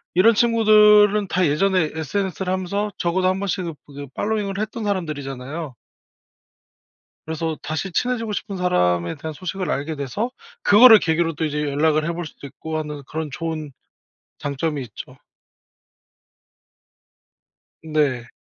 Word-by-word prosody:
이런 225 +6 +6
친구들은 210 -2 +5
다 180 0 +2
예전에 165 +2 +2
SNS를 185 +3 -2
하면서 200 +3 -2
적어도 185 +2 +1
1 185 +1 -1
번씩은 180 -4 -3
그게 140 0 -9
팔로잉을 205 -2 -2
했던 215 +1 -4
사람들이잖아요. 150 -6 -4 1.5
그래서 160 0 -3
다시 160 +5 -4
친해지고 230 +3 -1
싶은 205 -1 -4
사람에 90 - +1
대한 155 +2 -6
소식을 185 +3 -4
알게 150 +2 -2
돼서 200 - -3 0.3
그거를 220 +2 +9
계기로 165 0 +1
또 160 - -3
이제 150 -1 -1
연락을 155 +2 +1
해 170 - -1
볼 175 0 -5
수도 145 - -10
있고 155 +3 -6
하는 150 -2 -6
그런 160 0 -4
좋은 155 -4 -4 0.7
장점이 145 +1 -2
있죠. 115 -5 -9 2.7
네. 145 -6 0
165 Hz, 295 characters per minute, -22 LUFS, 150-200 Hz, 2.7 s, 그거를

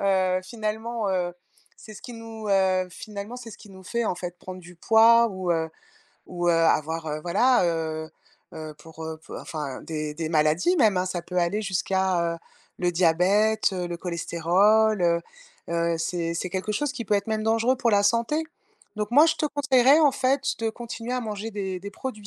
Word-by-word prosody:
heu, 185 -2 +2
finalement, 220 +2 -3
heu, 180 -2 -1 0.5
c'est 215 - -12
ce 205 - -12
qui 245 - -8
nous, 225 -1 -8
heu, 190 -2 +2
finalement, 210 +5 -8
c'est 240 -2 -9
ce - - -11
qui 205 - -14
nous 190 -1 -14
fait 235 +4 -2
en - - 0
fait 175 0 -6
prendre 185 0 -9
du 180 0 -14
poids 230 +5 +5
ou, 185 -3 -3
heu, 160 -1 -1 0.6
ou, 175 -1 -2
heu, - - +5
avoir 160 -1 +1
voilà, 240 +7 +3
heu, 160 -1 -2 0.4
heu, 155 -1 -7
pour, 160 +1 -10
heu 160 0 -6 0.2
enfin 145 -5 -6
des 155 -2 -4
des 160 +1 -3
maladies 160 - +2
même, 215 -7 +4
hein, 180 0 +1
ça 180 -2 -3
peut 180 +1 -7
aller 180 +5 0
jusqu'à, 190 -2 0
heu, - - -9 0.4
le 180 -1 +1
diabète, 190 +6 +3
heu, 180 -2 -3
le 175 - -4
cholestérol, 180 +5 +2
heu, 170 -1 +3 0.5
heu, 170 0 0
c'est 170 0 -2
c'est 180 +2 -3
quelque 190 +4 -2
chose 285 +6 -1
qui 235 - -5
peut 210 - +1
être 200 0 0
même 220 -1 -1
dangereux 225 +3 +2
pour 240 -2 +1
la 200 -1 +4
santé. 235 +9 +1 0.5
Donc 210 0 -3
moi 290 +6 +7
je 320 - +2
te 305 - 0
conseillerais, 275 -1 +4
en 295 -3 +5
fait, 270 +1 +1 0.2
de 225 -1 0
continuer 235 +1 -6
à 255 - -1
manger 215 -1 -5
des 190 -3 -4
des 200 +2 -7
produits 215 -1 -7
190 Hz, 195 wpm, -25 LUFS, 170-225 Hz, 0.6 s, moi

